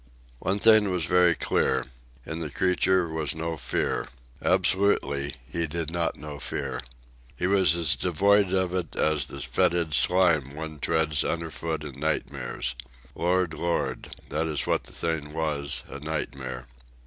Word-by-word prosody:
One 95 +2 0
thing 110 -1 +5
was 90 -4 0
very 90 -2 +4
clear. - - +1 0.4
In 80 - -5
the 80 -2 -4
creature 90 +2 +2
was 80 -2 -1
no 80 +1 -3
fear. - - -2 0.3
Absolutely, 75 -8 +2
he 85 +3 -2
did 80 +1 -3
not 85 -1 -1
know 75 0 -8
fear. - - -4 0.5
He 90 - -2
was 95 -4 +4
as 85 +1 +3
devoid 100 +2 +3
of 95 -1 0
it 90 -4 -3
as 75 -3 +1
the - - -7
fetid 85 -3 +1
slime 80 -5 +4
one 80 -1 -6
treads 80 -1 +1
underfoot 80 -1 -3
in 75 - -8
nightmares. - - -2 0.4
Lord, 90 -1 +1
Lord! 85 +1 -2
that 80 +2 -1
is 75 -3 0
what - - 0
the - - -11
thing 80 -3 -3
was, 75 -3 -1
a 70 - -8
nightmare. 65 -4 -5
80 Hz, 150 wpm, -26 LUFS, 75-90 Hz, 0.5 s, thing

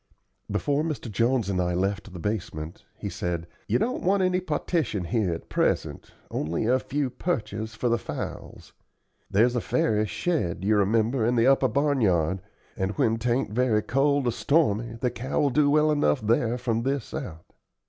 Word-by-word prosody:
Before 145 0 0
Mr. 155 -7 -4
Jones 115 +1 +1
and 95 -2 0
I 90 0 0
left 100 +2 -1
the 90 - -8
basement, 90 -3 -4
he 105 - -5
said: 90 -3 -3 0.2
"You - - +2
don't 240 +4 -1
want 190 +1 +2
any 185 0 +2
partition 155 - -1
here 105 0 0
at 85 - -5
present, - - -1 0.2
only 85 +7 -1
a 125 +3 +3
few 140 0 -2
perches 110 - -3
for 120 +2 -1
the 120 0 +2
fowls. - - -7 0.6
There's 120 +5 +3
a 120 - +1
fairish 105 -1 +1
shed, 95 - -1
you 105 +1 +3
remember, 110 +4 +2
in 120 +2 +2
the 115 0 +3
upper 135 0 +4
barnyard, 105 - +1 0.3
and 95 0 -2
when 115 0 +2
'tain't 120 0 0
very 110 -2 +2
cold 140 +1 +2
or 120 - +2
stormy 115 -5 +1
the 125 - +1
cow 130 +3 -3
will 145 -2 +2
do 145 +2 +3
well 155 +1 +4
enough 110 - +2
there 115 +2 +1
from 115 -2 -1
this 135 0 -2
out. 90 - -7
115 Hz, 175 wpm, -26 LUFS, 100-135 Hz, 0.6 s, upper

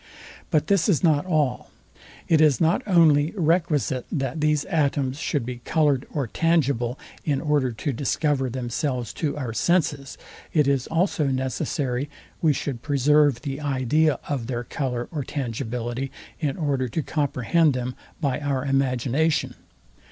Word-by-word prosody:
But 150 -1 +2
this 200 0 +2
is 180 -4 +2
not 155 0 +3
all. 150 -7 0 0.6
It 160 -2 +4
is 150 -6 +4
not 165 +3 +3
only 160 -5 +4
requisite, 150 - +1
that 135 0 -2
these 150 -1 +2
atoms 140 -5 0
should 145 -6 -1
be 125 0 -5
coloured 145 -4 +1
or 145 -4 -1
tangible, 135 -2 +1 0.3
in 145 -3 0
order 145 -5 +1
to 125 +5 -3
discover 140 +1 0
themselves 125 0 -3
to 150 -3 -1
our 125 -6 -4
senses; 145 0 0 0.4
it 150 -4 +3
is 135 -2 +1
also 165 -2 +1
necessary 130 +1 -2 0.3
we 160 - +4
should 135 -3 -3
preserve 145 -1 +3
the 140 -1 -4
idea 145 +1 +2
of 130 -6 -2
their 120 -2 -3
colour 125 -2 -3
or 150 -4 -3
tangibility 125 0 -4 0.3
in 145 -4 -1
order 140 -5 0
to 150 +6 -2
comprehend 145 +1 +1
them 125 0 -3 0.3
by 135 -3 0
our 140 -2 -1
imagination. 135 +3 +1
140 Hz, 145 wpm, -24 LUFS, 130-155 Hz, 0.6 s, It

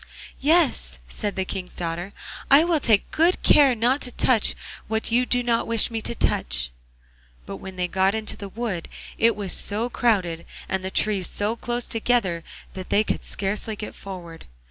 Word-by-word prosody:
'Yes,' 285 - +2
said 205 - -3
the 190 - -1
King's 185 -1 -5
daughter, 175 +2 -4 0.4
'I 280 +3 +8
will 335 -2 +2
take 220 -6 +3
good 335 +3 +3
care 275 -4 +6
not 245 +5 +2
to 250 - -1
touch 235 -2 +2 0.3
what 220 +1 -2
you 245 +2 +2
do 245 0 +1
not 235 -1 +1
wish 230 0 +3
me 225 -1 -3
to 235 - -2
touch.' - - 0 0.7
But 100 - -6
when 190 - -9
they 180 -1 -1
got 190 +3 +1
into 220 -1 -2
the 200 - -8
wood 210 -5 -4 0.3
it 230 -1 +4
was 200 -3 -2
so 225 +4 -1
crowded, 185 -10 0 0.2
and 190 -1 -2
the 190 - -2
trees 195 -2 +1
so 210 +3 -1
close 240 +1 -3
together, 220 -7 0 0.3
that 185 -1 -7
they 210 - +3
could - - -2
scarcely 210 +2 -2
get 210 0 -7
forward. 175 -4 -9
210 Hz, 180 wpm, -24 LUFS, 185-240 Hz, 0.7 s, I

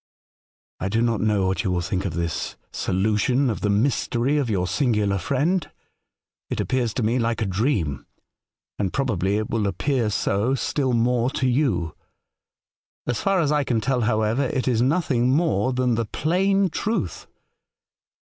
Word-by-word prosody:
"I 95 - -2
do 110 +3 0
not 115 -2 +1
know 105 -2 +2
what 95 +3 0
you 100 - -1
will 90 -1 0
think 95 +2 -2
of 85 -5 -3
this 85 -2 -3 0.2
solution 110 +7 +1
of 110 - -5
the 105 - 0
mystery 120 +4 +1
of 135 -5 -1
your 95 -4 0
singular 105 -4 +1
friend. 145 - 0 0.8
It - - -3
appears 120 -4 0
to 125 - -1
me 115 +4 +1
like 115 0 0
a 110 - 0
dream, 95 - -1 0.7
and 95 -3 0
probably 105 -7 0
it 110 0 -3
will 110 -2 0
appear 115 - 0
so 105 +4 0
still 135 -1 -1
more 120 +1 +2
to 130 -1 -1
you. 125 - 0 1.1
As 120 - -1
far 195 -2 +2
as 150 -3 +1
I 150 -1 +2
can 120 -4 0
tell, 125 +2 0
however, 110 +3 +1
it 130 +1 -2
is 120 -3 +2
nothing 130 -3 +2
more 130 - +2
than 125 -1 +1
the 115 0 0
plain 190 - +1
truth. 205 - -2
115 Hz, 165 wpm, -23 LUFS, 105-135 Hz, 1.1 s, know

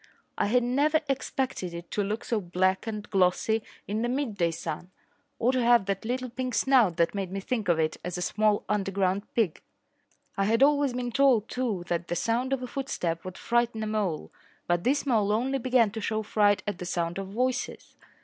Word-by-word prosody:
I - - +1
had 245 +3 +3
never 290 +6 +2
expected 265 -8 -2
it 170 0 -9
to 210 - 0
look 210 +3 -3
so 225 -3 0
black 185 +3 0
and 210 -2 -4
glossy 195 +4 +2 0.3
in 210 +2 -1
the 240 - 0
midday 230 -10 0
sun 165 +1 -5 0.5
or 240 +2 +2
to 255 -1 +1
have 235 -3 +5
that 195 +1 -2
little 250 +1 -2
pink 255 0 -3
snout 240 -11 +4
that 165 0 +2
made 195 -3 -3
me 195 - -3
think 215 -1 -2
of 170 - +4
it 155 -1 0
as 180 0 -4
a - - -4
small 210 +1 +1
underground 195 -1 0
pig. 215 -9 +1 0.8
I 195 - +2
had 230 +5 +3
always 285 -2 +3
been 245 -1 -3
told, 255 -5 +4
too, 230 -8 -2
that 170 0 -2
the 175 - -2
sound 235 +8 0
of 265 -2 0
a - - -4
footstep 175 -11 -3
would 185 -1 -7
frighten 235 -2 0
a - - -1
mole, 210 -7 -2 0.3
but 175 0 +1
this 280 +4 +2
mole 215 -6 +2
only 260 +5 0
began 245 -4 +3
to 220 +1 -5
show 220 +1 -1
fright 205 -1 +2
at 205 -3 -3
the 180 - -5
sound 170 +1 -2
of 195 - -5
voices. 250 +6 -2
215 Hz, 205 wpm, -28 LUFS, 185-250 Hz, 0.8 s, have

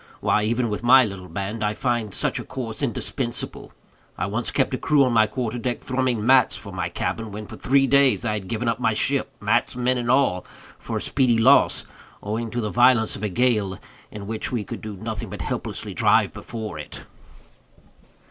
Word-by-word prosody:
Why, 105 - +2
even 120 +1 0
with 105 - -3
my 130 +2 +7
little 95 -3 -7
band, 100 +5 -4
I 105 0 0
find 120 -5 -1
such - - -1
a - - -5
course 120 -3 -6
indispensable. 120 -1 -3 0.5
I - - -1
once 110 +5 -2
kept - - 0
a - - 0
crew 150 -3 +3
on 125 -2 +1
my 110 -1 +5
quarter 120 +1 -3
deck 120 0 -2
thrumming 125 -4 -1
mats 130 -1 +5
for 100 - -8
my 90 -2 -2
cabin, 105 +5 -3
when, 105 +1 -7
for - - -10
three 135 +1 +3
days, 140 -2 +3
I 110 - 0
had 100 -3 -4
given 115 +4 -3
up 115 +1 0
my 115 -3 +1
ship—mats, - - 0
men, 125 0 +1
and 120 0 -3
all—for 125 -9 -1
a - - -3
speedy 125 -4 +2
loss, 115 - +4 0.4
owing 110 +3 -3
to 120 +2 -3
the 105 -2 -3
violence 120 -2 +4
of - - -8
a 105 - -1
gale, 105 -3 +1 0.3
in 105 -1 -8
which 110 +1 -3
we 120 -4 -1
could - - -7
do 105 -1 -6
nothing 110 0 -5
but - - -7
helplessly - - -4
drive - - +3
before 110 -2 -7
it." - - -8
115 Hz, 195 wpm, -23 LUFS, 105-125 Hz, 0.5 s, my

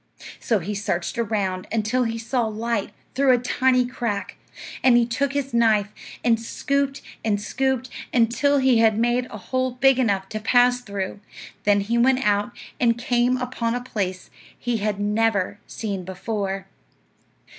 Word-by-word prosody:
So 225 - +1
he 200 +3 -4
searched 200 +2 -2
around 200 -5 -1
until 225 +3 +1
he 230 0 -2
saw 235 +1 -1
light 220 -1 -2 0.2
through 265 -1 +4
a - - +4
tiny 255 +1 +2
crack; 235 -5 -3 0.5
and 250 -2 +6
he 240 - +4
took 270 +4 -1
his 275 -2 -2
knife 220 -3 +3 0.3
and 230 -2 +3
scooped 275 +4 -1 0.2
and 210 -2 +1
scooped, 260 +3 -1 0.2
until 245 +4 +3
he 260 -3 +4
had 220 -2 +4
made 240 +2 +1
a 215 - -8
hole 255 +5 -2
big 265 +1 +4
enough 200 -6 +1
to 215 - -4
pass 245 +2 +3
through; 200 -3 -5 0.5
then 205 0 +4
he 230 +4 0
went 260 +1 +3
out, 205 +3 +2 0.3
and 235 -1 +3
came 245 +1 +1
upon 245 -2 -2
a - - -1
place 190 -7 -4 0.3
he 240 -1 -1
had 205 -1 -2
never 205 -1 +1
seen 200 -4 -4
before. 195 +1 -3
230 Hz, 155 wpm, -23 LUFS, 205-250 Hz, 0.5 s, and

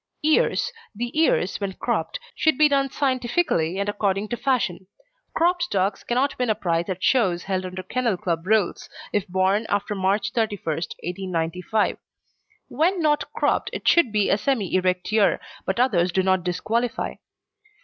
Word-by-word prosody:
EARS 315 +9 +2 0.2
The 240 +5 -4
ears, 195 - +2
when 195 -1 -2
cropped, - - -2
should 315 -4 +2
be 305 - +6
done 275 -1 +1
scientifically 255 - 0
and 200 +1 -1
according 205 0 -1
to - - -1
fashion. 235 -8 -1 0.5
Cropped 350 +1 +2
dogs 195 +1 0
cannot 255 +3 0
win 250 -2 0
a 215 - +3
prize 170 -1 -1
at 185 0 -4
shows 185 -9 +2
held 185 -1 -2
under 185 0 -6
Kennel 235 0 -1
Club 170 0 -2
rules, 215 -3 +1 0.2
if 205 -2 0
born 190 +4 +1
after 205 +1 0
March 200 +1 0
31st, 200 -8 -2
1895. 180 +3 -1 0.7
When 355 +4 +1
not 300 -2 +1
cropped, - - +1
it - - -5
should 340 -10 +5
be 210 -1 +2
a 200 - +2
semi 230 -9 -1
erect 185 +1 0
ear, 210 -3 +3 0.3
but 190 +4 -1
others 185 -9 +2
do 190 +2 +1
not 185 -1 +2
disqualify. 220 +7 -1
205 Hz, 160 wpm, -24 LUFS, 185-250 Hz, 0.7 s, be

